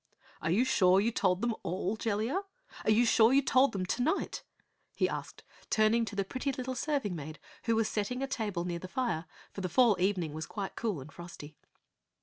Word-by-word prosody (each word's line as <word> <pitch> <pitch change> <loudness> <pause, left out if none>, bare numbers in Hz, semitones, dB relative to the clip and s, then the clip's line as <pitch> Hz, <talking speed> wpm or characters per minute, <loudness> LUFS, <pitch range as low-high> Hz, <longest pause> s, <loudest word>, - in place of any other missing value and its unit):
"Are - - -1
you 210 +10 +3
sure 185 -6 +4
you 220 +4 +2
told 185 -4 +1
them 240 -1 +1
all, 185 +4 -2
Jellia? 225 - -1 0.4
Are - - +2
you 220 +3 +5
sure 225 0 +5
you 275 +1 +5
told 265 +1 +4
them 190 -2 -2
tonight?" 245 - -1 0.5
he - - +2
asked, - - -6 0.3
turning 220 +2 +3
to 205 -1 -7
the 195 -1 0
pretty 255 +7 -2
little 260 0 -4
serving 255 - -1
maid 155 0 -7 0.3
who 230 -1 +2
was 220 -1 +2
setting 250 +5 -2
a - - -1
table 205 -9 -2
near 175 -1 -3
the 185 - -7
fire, 180 -7 -1 0.3
for 195 - -6
the 185 - -2
fall 230 +3 +5
evening 180 -5 +1
was 155 0 -5
quite 200 -3 -5
cool 210 - -2
and 140 +3 -11
frosty. 165 -3 -10
210 Hz, 200 wpm, -31 LUFS, 180-240 Hz, 0.5 s, you